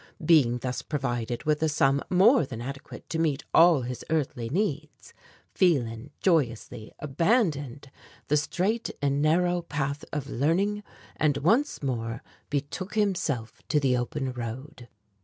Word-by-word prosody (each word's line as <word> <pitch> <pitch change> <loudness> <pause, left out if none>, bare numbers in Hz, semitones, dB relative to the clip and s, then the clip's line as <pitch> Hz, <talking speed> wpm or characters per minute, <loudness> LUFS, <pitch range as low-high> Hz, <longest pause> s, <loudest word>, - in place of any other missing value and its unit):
Being 140 -8 +5
thus 125 +1 -3
provided 120 -5 -3
with 150 0 +1
a 160 - +2
sum 140 -1 +2
more 205 +7 +5
than 130 -4 -6
adequate 140 +4 -8
to 160 - -2
meet 150 -3 0
all 165 -5 +6
his 125 0 -5
earthly 135 -7 -1
needs, 155 - -3 0.4
Phelan 130 -8 +1
joyously 120 - 0
abandoned 145 - 0 0.4
the 150 - +2
straight 185 +9 0
and 140 0 0
narrow 175 +3 +2
path 145 -2 -3
of 145 -2 -3
learning, 180 - 0 0.4
and 150 -2 +2
once 215 - +1
more 115 -3 -3 0.3
betook 150 +8 -4
himself 165 - -1
to 150 - +2
the 135 -3 +2
open 130 +2 -2
road. 125 +3 -7
145 Hz, 135 wpm, -27 LUFS, 125-165 Hz, 0.4 s, all